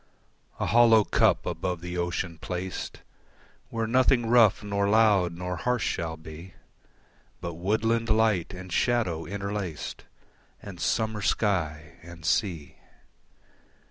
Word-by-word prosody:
A - - 0
hollow 115 -1 +6
cup - - +2
above 90 -2 -3
the 90 0 -6
ocean 85 -1 -3
placed 90 +2 -5 0.7
Where 115 -1 -2
nothing 125 +1 +3
rough, 115 -3 +4
nor 100 -1 0
loud, 105 -5 +4
nor 90 +1 -4
harsh 125 +4 0
shall 80 -1 -3
be, 80 +3 -11 0.8
But 85 0 -5
woodland 110 +6 0
light 110 -5 +2
and 95 -2 -8
shadow 110 -10 0
interlaced 100 -4 -5 0.5
And 95 -4 -10
summer 110 +1 -1
sky 80 -8 -1
and 85 0 -12
sea. 85 -6 -1
95 Hz, 115 wpm, -27 LUFS, 85-110 Hz, 0.8 s, hollow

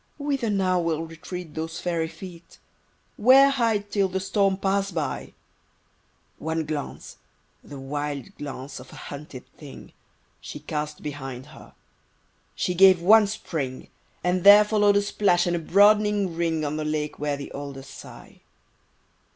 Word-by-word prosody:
Whither 280 -5 -2
now 185 -3 +1
will 165 -2 -1
retreat 165 0 -8
those 160 +1 -5
fairy 170 -2 -1
feet? 170 -1 -12 0.6
Where 270 +4 +6
hide 225 -6 0
till 200 -2 +2
the 190 0 -3
storm 195 0 +1
pass 195 0 0
by? 155 -7 -4 1.0
One 160 +1 -2
glance—the 145 -1 -9
wild 145 +5 -5
glance 135 -1 -7
of 125 - -13
a - - -12
hunted 140 -3 -9
thing— 145 -3 -12 0.5
She - - -9
cast 150 0 -5
behind 135 -4 -6
her; - - -15 0.8
she 180 - -1
gave 185 0 +6
one 210 +4 +6
spring; 150 -10 -5 0.3
And 180 0 0
there 205 +1 +9
follow'd 205 -1 +3
a 205 - +2
splash 190 -3 +2
and 175 -1 0
a - - -1
broadening 205 +1 +3
ring 165 -2 -1
On 145 +1 -3
the 155 - -2
lake 150 0 -3
where 145 -1 -1
the 140 - -8
alders 140 -1 -7
sigh. - - -13
170 Hz, 145 wpm, -25 LUFS, 150-200 Hz, 1.0 s, there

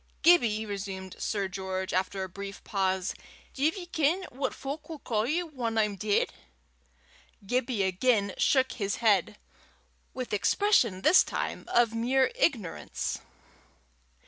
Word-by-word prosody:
"Gibbie," 235 -11 +5
resumed 195 -2 -6
Sir 200 -2 -1
George, 190 0 -4
after 190 +1 -1
a - - -4
brief 200 +2 -8
pause, 190 -2 0 0.4
"div 305 +7 +1
ye 360 - -6
ken 335 +2 +1
what 265 +1 -2
fowk'll 300 +3 -6
ca' 220 -6 -1
ye 325 +8 0
whan 250 -9 -3
I'm 210 -2 +2
deid?" 205 +1 0 1.1
Gibbie 245 -1 0
again 200 +1 +1
shook 260 -2 +3
his 200 -3 -2
head 210 -3 +2 0.7
with 255 -4 -5
expression 230 - +2
this 370 - +7
time - - -4
of 235 -1 +3
mere 255 - +2
ignorance. 275 - -1
220 Hz, 125 wpm, -29 LUFS, 195-270 Hz, 1.1 s, this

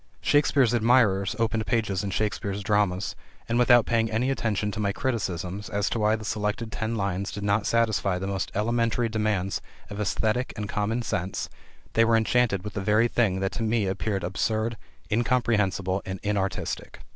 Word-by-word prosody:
Shakespeare's 140 -4 +3
admirers 110 -5 +3
opened 115 -1 0
pages 105 -4 0
in 100 - -2
Shakespeare's 100 0 -2
dramas, 100 -2 +1 0.3
and 115 +1 +1
without 120 -1 +6
paying 115 -1 +1
any 120 +5 0
attention 105 -5 -1
to 105 - -6
my 100 -2 +1
criticisms 100 - -3
as 100 +1 -1
to 115 - -1
why 105 +1 +3
the 110 -1 -7
selected 105 +1 -2
ten 110 +1 -2
lines 100 -1 -2
did 100 - -6
not 100 +1 +1
satisfy 110 -5 +1
the 95 - -4
most 95 -1 -2
elementary 115 +2 +1
demands 105 -3 -1 0.3
of 100 +1 -4
esthetic 110 +5 0
and 105 -1 -3
common 110 +4 -1
sense, 95 -2 -3 0.4
they 115 - +5
were 115 0 +4
enchanted 110 -3 +2
with 105 -2 -6
the 100 - -3
very 105 +4 +3
thing 105 -6 +1
which 95 0 -1
to - - -3
me 110 -1 +1
appeared 95 0 -2
absurd, 110 +5 -1 0.4
incomprehensible, 105 -5 +1
and 95 0 -5
inartistic. 100 -2 -2
105 Hz, 170 wpm, -26 LUFS, 100-115 Hz, 0.4 s, without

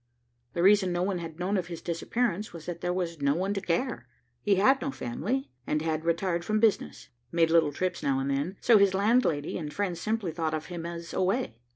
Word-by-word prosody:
The 170 - 0
reason 195 -1 +5
no 175 0 0
one 190 -1 -1
had 165 -2 -7
known 190 +3 0
of 180 -2 -2
his 170 -2 -6
disappearance 210 +4 -2
was 165 -2 -9
that 175 -1 -5
there 175 - 0
was 170 -4 -3
no 140 +1 +2
one 190 +4 0
to 195 - -2
care. 190 - -1 0.3
He 205 - +3
had 265 +8 +4
no 275 - -1
family 240 - -3 0.2
and 150 +1 0
had 160 0 -1
retired 170 +1 0
from 215 +3 0
business, 220 - +1 0.2
made 165 -1 +3
little 165 -3 +4
trips 185 +5 -2
now 140 -3 +1
and 135 +1 -1
then, 145 +8 -2
so 225 -3 +6
his 195 -1 +4
landlady 200 - +2
and 150 -3 -5
friends 185 -3 -2
simply 215 -5 -1
thought 160 -1 -1
of 155 - -4
him 170 -1 -4
as 170 0 -7
away. 190 - 0
175 Hz, 220 wpm, -28 LUFS, 165-200 Hz, 0.3 s, so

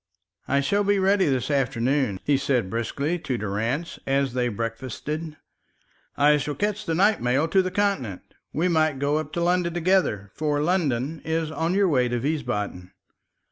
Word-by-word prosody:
"I 140 +1 +2
shall 200 +9 +1
be 205 0 +2
ready 195 -1 +3
this 135 +1 0
afternoon," 130 -4 +1
he 145 - +2
said 125 -8 0
briskly 140 +9 -2
to 130 -6 -3
Durrance 115 - -2
as 135 -2 +1
they 125 -1 +1
breakfasted. 130 +8 -4 0.8
"I 150 +1 +5
shall 145 0 -3
catch 210 0 -2
the 165 - 0
night 205 +5 +3
mail 130 +6 +2
to 190 +3 +4
the 185 - -2
Continent. 185 - -1 0.3
We 165 +4 0
might 155 -4 +2
go 145 +2 +1
up 155 -1 -6
to 170 - -1
London 175 -1 +1
together; 170 - +1
for 150 -2 -1
London 150 -3 0
is 160 -1 -1
on 165 +3 -1
your 200 -1 +4
way 130 -7 +2
to 120 0 -1
Wiesbaden." 105 - -3
145 Hz, 170 wpm, -25 LUFS, 125-170 Hz, 0.8 s, I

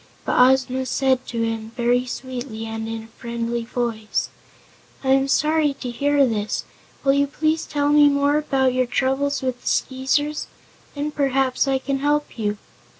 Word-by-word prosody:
But - - +1
Ozma 260 0 +3
said 260 0 +1
to 230 -1 -2
him, 225 0 -3
very 245 +1 +2
sweetly 245 -3 -5
and 225 0 -4
in 225 0 -5
a - - -13
friendly 235 0 -3
voice: 230 -3 -2 0.7
"I 265 - -1
am 270 0 +4
sorry 300 0 +2
to 250 -2 -5
hear 285 +3 +3
this. 215 -3 -2 0.4
Will 275 -1 +4
you 280 0 +2
please 310 +2 -1
tell 290 -1 0
me 295 0 +6
more 285 +1 +2
about 265 -3 +1
your 255 -1 +1
troubles 270 +3 0
with 255 -1 -2
the - - -11
Skeezers? 290 +3 0 0.5
Then 290 +1 -2
perhaps 270 -2 +1
I 270 -1 +2
can 270 +1 -2
help 290 -2 0
you." 210 -1 -1
265 Hz, 165 wpm, -22 LUFS, 240-285 Hz, 0.7 s, me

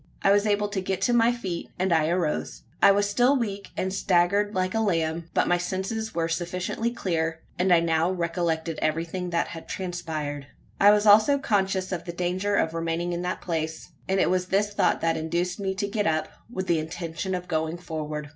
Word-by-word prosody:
I 195 - +5
was 205 +1 +3
able 205 0 +2
to 200 -2 -2
get 190 0 -2
to 245 - +2
my 235 0 +5
feet; 190 -8 -4
and 185 -1 +1
I 160 -1 +3
arose. 170 -3 -1 0.2
I - - +8
was 205 +1 +2
still 245 +7 +3
weak, 200 -5 -3
and 190 0 -1
staggered 195 +3 +2
like 185 0 0
a 225 - +1
lamb; 165 -5 0
but - - +3
my 175 0 +2
senses 190 +5 -3
were 165 -1 +1
sufficiently 180 +6 -2
clear; 165 -7 -2 0.2
and 185 +1 +2
I 170 -1 +6
now 165 0 +2
recollected 170 -2 -1
everything 165 +3 -1
that 170 -1 0
had 165 -1 -9
transpired. 155 -6 -4 0.3
I 200 - +7
was 210 0 +4
also 215 +7 +6
conscious 195 -7 0
of 175 -2 -3
the 170 - -5
danger 185 +3 -1
of 160 -4 +1
remaining 165 +1 -2
in 175 - -2
that 180 +1 -3
place; 160 -2 -3 0.2
and 190 0 +2
it - - +3
was 185 0 0
this 205 +2 +1
thought - - +2
that 165 0 +1
induced 170 +4 -2
me 190 -1 -2
to 200 +1 -1
get 205 -1 -1
up 155 -1 0 0.2
with 190 -6 -4
the 170 -3 +2
intention 170 +3 -4
of 180 0 -5
going 160 0 -1
forward. 155 -3 -5
180 Hz, 205 wpm, -26 LUFS, 165-200 Hz, 0.3 s, I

